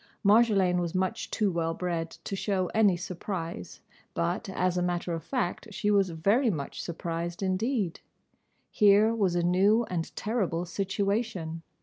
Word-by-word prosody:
Marjolaine 200 -4 +4
was 170 0 -3
much 185 +4 -1
too 210 -3 +1
well 165 -1 -1
bred 170 -2 -2
to 195 - -7
show 190 -2 -1
any 205 -5 +4
surprise, 175 - -5 0.3
but, 85 - -1
as 185 -1 0
a 180 - +1
matter 175 -1 -1
of 165 - -4
fact, 255 -3 -2
she 210 +1 0
was 200 -2 +3
very 200 - +2
much 150 -8 -4
surprised 170 +1 -4
indeed. 195 0 -1 0.7
Here 210 +2 +5
was 195 -6 +1
a 175 - +1
new 195 +6 +4
and 165 -2 -2
terrible 195 -6 -1
situation. 195 -2 -2
185 Hz, 145 wpm, -28 LUFS, 170-205 Hz, 0.7 s, Here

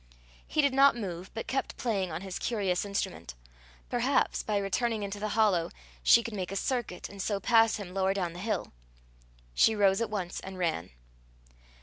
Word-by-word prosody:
He 305 - +2
did 280 -2 +3
not 275 0 +6
move, 185 -5 -5
but 225 - -4
kept 270 +1 -2
playing 195 -7 -1
on 160 +2 -4
his 190 -1 -5
curious 200 -5 0
instrument. 200 - -4 0.5
Perhaps, - - +1
by 210 -1 -1
returning 210 +3 0
into 200 +1 -4
the 215 - -2
hollow, 195 -7 +3 0.3
she 235 - +6
could 230 - -6
make 185 -3 -4
a - - -4
circuit, 240 -4 -2
and 200 -1 -8
so 200 0 -1
pass 225 +2 +4
him, 195 -4 -7
lower 195 0 +1
down 175 -4 -2
the 175 - -9
hill. 215 - -2 0.8
She 220 - +4
rose 195 0 +3
at 230 - -1
once 195 -4 -3
and 190 0 -8
ran. 165 - -1
200 Hz, 185 wpm, -29 LUFS, 185-225 Hz, 0.8 s, not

